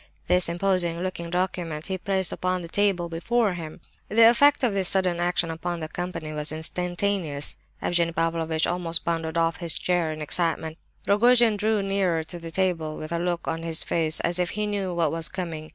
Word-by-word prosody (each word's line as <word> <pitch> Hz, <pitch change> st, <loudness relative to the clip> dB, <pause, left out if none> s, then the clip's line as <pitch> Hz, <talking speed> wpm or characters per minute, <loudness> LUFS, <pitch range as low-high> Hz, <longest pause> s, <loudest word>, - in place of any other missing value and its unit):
This 180 Hz, -1 st, +2 dB
imposing 175 Hz, -1 st, 0 dB
looking 170 Hz, -2 st, -4 dB
document 175 Hz, -3 st, -2 dB
he 190 Hz, -, -2 dB
placed 190 Hz, -1 st, 0 dB
upon 185 Hz, 0 st, -1 dB
the -, -, -6 dB
table 190 Hz, -1 st, +1 dB
before 200 Hz, +6 st, 0 dB
him. 165 Hz, -1 st, -8 dB, 0.3 s
The 225 Hz, +1 st, +7 dB
effect 285 Hz, +4 st, +4 dB
of 235 Hz, -5 st, +2 dB
this 195 Hz, -2 st, +1 dB
sudden 185 Hz, -3 st, +2 dB
action 175 Hz, -1 st, +1 dB
upon 170 Hz, +1 st, -4 dB
the 155 Hz, -, -4 dB
company 165 Hz, -2 st, -5 dB
was 150 Hz, 0 st, -2 dB
instantaneous. 175 Hz, -1 st, 0 dB, 0.3 s
Evgenie 170 Hz, -1 st, +1 dB
Pavlovitch 165 Hz, -1 st, 0 dB
almost 170 Hz, -2 st, -2 dB
bounded 165 Hz, -1 st, -1 dB
off 165 Hz, 0 st, +1 dB
his 170 Hz, -3 st, -1 dB
chair 175 Hz, -3 st, 0 dB
in 155 Hz, -, -6 dB
excitement. 160 Hz, 0 st, -2 dB, 0.3 s
Rogojin 235 Hz, +2 st, +5 dB
drew 210 Hz, 0 st, +1 dB
nearer 190 Hz, -4 st, +1 dB
to 165 Hz, +2 st, -7 dB
the 165 Hz, 0 st, -7 dB
table 165 Hz, -3 st, -1 dB
with 155 Hz, +1 st, -7 dB
a 170 Hz, -, 0 dB
look 175 Hz, -1 st, -2 dB
on 165 Hz, 0 st, -2 dB
his 165 Hz, -1 st, +1 dB
face 160 Hz, -2 st, +1 dB
as 170 Hz, +1 st, 0 dB
if 180 Hz, -1 st, +1 dB
he 210 Hz, -, 0 dB
knew 200 Hz, -3 st, -2 dB
what 170 Hz, -3 st, +1 dB
was 165 Hz, 0 st, -2 dB
coming. 165 Hz, -4 st, -5 dB
175 Hz, 190 wpm, -25 LUFS, 165-190 Hz, 0.3 s, The